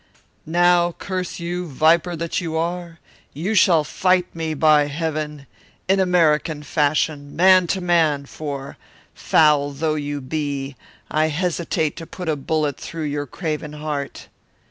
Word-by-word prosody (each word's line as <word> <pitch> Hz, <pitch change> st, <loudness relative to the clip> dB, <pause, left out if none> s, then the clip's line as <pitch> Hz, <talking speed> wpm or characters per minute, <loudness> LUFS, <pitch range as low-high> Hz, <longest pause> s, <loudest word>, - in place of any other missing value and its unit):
"Now, 175 Hz, +1 st, +3 dB
curse 185 Hz, 0 st, -5 dB
you, 175 Hz, +1 st, -4 dB
viper 165 Hz, +4 st, +2 dB
that 165 Hz, +2 st, -2 dB
you 160 Hz, -2 st, -3 dB
are, 170 Hz, 0 st, -3 dB, 0.4 s
you 175 Hz, +9 st, -2 dB
shall 175 Hz, -6 st, +5 dB
fight 185 Hz, +3 st, +1 dB
me, 160 Hz, -1 st, -3 dB
by 150 Hz, -1 st, +4 dB
heaven! 150 Hz, -1 st, -4 dB, 0.4 s
in 195 Hz, +1 st, +3 dB
American 160 Hz, -4 st, +2 dB
fashion, 145 Hz, -1 st, 0 dB
man 185 Hz, 0 st, +5 dB
to 190 Hz, +2 st, -1 dB
man, 160 Hz, -5 st, +2 dB
for, 140 Hz, -2 st, -7 dB, 0.4 s
foul 150 Hz, -2 st, +3 dB
though 155 Hz, +2 st, -1 dB
you 145 Hz, -1 st, -3 dB
be, 140 Hz, 0 st, -4 dB, 0.4 s
I 155 Hz, +1 st, +2 dB
hesitate 160 Hz, -1 st, -1 dB
to 165 Hz, -2 st, -8 dB
put 180 Hz, -3 st, -6 dB
a 155 Hz, -, +1 dB
bullet 150 Hz, 0 st, -1 dB
through 165 Hz, -1 st, -6 dB
your 145 Hz, -1 st, -3 dB
craven 155 Hz, 0 st, -4 dB
heart." 150 Hz, -2 st, -5 dB
155 Hz, 140 wpm, -21 LUFS, 145-175 Hz, 0.4 s, shall